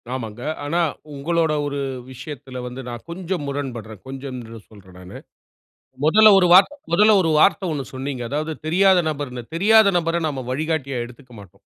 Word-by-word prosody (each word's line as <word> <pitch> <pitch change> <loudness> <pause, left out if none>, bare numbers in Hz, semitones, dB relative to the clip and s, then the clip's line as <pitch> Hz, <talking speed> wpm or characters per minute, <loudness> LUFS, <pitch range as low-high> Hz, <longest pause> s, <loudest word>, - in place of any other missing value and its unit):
ஆமாங்க. 115 -2 -7 0.2
ஆனா, 170 +4 0 0.3
உங்களோட 160 +2 0
ஒரு 140 0 -3 0.3
விஷயத்துல 130 -1 -8
வந்து 125 +2 -7
நான் 120 -1 -7
கொஞ்சம் 180 -2 -4
முரண்படுறேன். 120 -7 -6
கொஞ்சம்ன்னு 130 -4 -8
சொல்றேன் 95 -4 -16
நானு. 90 0 -11 0.9
முதல்ல 215 +6 +7
ஒரு 180 - +3
வார்த்தை, 200 +11 +6 0.2
முதல்ல 210 +3 +6
ஒரு 165 -2 +1
வார்த்தை 195 +1 +3
ஒன்னு 140 -3 -4
சொன்னீங்க. 130 -1 -4
அதாவது 155 +3 -2
தெரியாத 185 +2 +4
நபர்ன்னு 135 -5 -5
"தெரியாத 215 +3 +5
நபரை 170 0 -1
நாம 135 -4 -5
வழிகாட்டியா 140 -2 -2
எடுத்துக்க 125 +1 -15
மாட்டோம்." 100 - -18
145 Hz, 150 wpm, -21 LUFS, 125-170 Hz, 0.9 s, முதல்ல